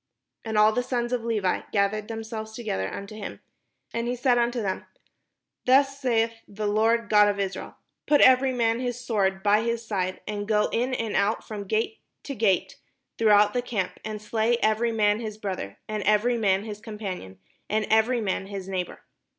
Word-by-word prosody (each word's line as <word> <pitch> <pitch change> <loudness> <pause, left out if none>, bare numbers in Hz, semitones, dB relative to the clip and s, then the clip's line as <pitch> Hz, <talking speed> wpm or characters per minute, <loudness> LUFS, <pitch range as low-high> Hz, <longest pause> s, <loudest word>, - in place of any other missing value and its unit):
And 220 -1 -2
all 215 +1 +6
the 245 - 0
sons 245 -1 -2
of 245 -2 -1
Levi 215 -5 0
gathered 210 +1 +1
themselves 220 -1 -6
together 155 - -3
unto 200 +1 -7
him. 210 -2 -7 0.5
And 235 0 -2
he 245 - -1
said 245 0 +2
unto 240 +1 0
them, 195 -4 -3 0.8
"Thus 275 +1 +4
saith 230 -4 +1
the 210 +1 -5
Lord 220 +2 +2
God 210 0 +6
of 200 0 -2
Israel, 195 -1 -4 0.3
'Put 295 -1 +5
every 260 +1 +6
man 230 -2 +1
his 245 -1 -3
sword 195 -6 0
by 210 +1 +4
his 235 0 -2
side, 185 -4 -2
and 205 0 -4
go 210 -1 +2
in 250 +2 0
and 225 -3 -2
out 205 +2 +1
from 210 -2 -6
gate 225 - -1 0.2
to 280 - -5
gate 205 -6 +1 0.4
throughout 210 -2 +5
the 245 - +1
camp, 220 -7 -3
and 215 0 -5
slay 220 +2 +1
every 220 +2 +2
man 210 -1 +2
his 215 -2 -5
brother, 185 - -5
and 215 -1 -3
every 210 +4 +3
man 200 -4 +2
his 210 -1 -7
companion, 195 - -6 0.3
and 215 +1 +1
every 225 +2 +3
man 195 -2 -2
his 195 -2 -6
neighbour.' 185 -2 -4
220 Hz, 185 wpm, -26 LUFS, 205-235 Hz, 0.8 s, all